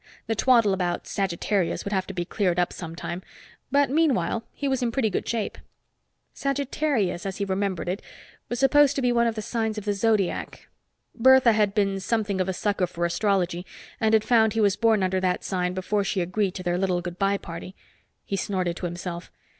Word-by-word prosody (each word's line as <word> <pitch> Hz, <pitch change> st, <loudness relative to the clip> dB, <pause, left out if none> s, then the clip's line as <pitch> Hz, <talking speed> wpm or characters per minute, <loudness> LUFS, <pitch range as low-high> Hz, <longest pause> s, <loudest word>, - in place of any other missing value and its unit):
The 225 Hz, -, 0 dB
twaddle 230 Hz, -3 st, +4 dB
about 180 Hz, -2 st, -1 dB
Sagittarius 195 Hz, 0 st, -1 dB
would 200 Hz, -, -3 dB
have 190 Hz, -1 st, 0 dB
to 195 Hz, -, -6 dB
be 175 Hz, -1 st, -2 dB
cleared 180 Hz, -2 st, 0 dB
up 180 Hz, 0 st, +1 dB
sometime, 170 Hz, +1 st, -6 dB, 0.5 s
but 285 Hz, +1 st, +4 dB
meanwhile 255 Hz, -, +1 dB
he 285 Hz, -, -4 dB
was 265 Hz, -1 st, 0 dB
in 240 Hz, -2 st, 0 dB
pretty 230 Hz, -4 st, 0 dB
good -, -, -2 dB
shape. 225 Hz, -3 st, -2 dB, 0.7 s
Sagittarius, 275 Hz, -, -1 dB
as 195 Hz, -1 st, -4 dB
he 200 Hz, -, -1 dB
remembered 190 Hz, -3 st, -2 dB
it, 185 Hz, +3 st, -2 dB, 0.5 s
was 240 Hz, -, -2 dB
supposed 285 Hz, +1 st, +5 dB
to 275 Hz, -, -1 dB
be 245 Hz, -, +3 dB
one 235 Hz, -1 st, +3 dB
of 230 Hz, -, -1 dB
the 215 Hz, -, -4 dB
signs 220 Hz, -2 st, -2 dB
of 210 Hz, -, -5 dB
the 205 Hz, -, +1 dB
Zodiac. 205 Hz, -2 st, -1 dB, 0.5 s
Bertha 260 Hz, 0 st, +6 dB
had 210 Hz, -2 st, +1 dB
been 195 Hz, -2 st, +1 dB
something 205 Hz, -2 st, -1 dB
of 185 Hz, -, -1 dB
a -, -, 0 dB
sucker 200 Hz, -1 st, 0 dB
for 175 Hz, 0 st, -2 dB
astrology 180 Hz, -1 st, 0 dB, 0.4 s
and 220 Hz, -1 st, +3 dB
had 215 Hz, -, +3 dB
found 220 Hz, -1 st, +4 dB
he 225 Hz, -, -1 dB
was 205 Hz, -2 st, +3 dB
born 225 Hz, -4 st, +3 dB
under 185 Hz, 0 st, +1 dB
that 185 Hz, -1 st, 0 dB
sign 180 Hz, -1 st, -1 dB
before 200 Hz, +2 st, 0 dB
she 195 Hz, 0 st, -1 dB
agreed 190 Hz, +2 st, -1 dB
to 185 Hz, -, -5 dB
their 175 Hz, 0 st, 0 dB
little 185 Hz, -2 st, +1 dB
good 175 Hz, 0 st, -7 dB
by 195 Hz, 0 st, +2 dB
party. 175 Hz, +1 st, -8 dB, 0.5 s
He 195 Hz, -, -2 dB
snorted 185 Hz, -3 st, -1 dB
to 180 Hz, -, -3 dB
himself. 175 Hz, 0 st, -6 dB
200 Hz, 200 wpm, -25 LUFS, 180-225 Hz, 0.7 s, Bertha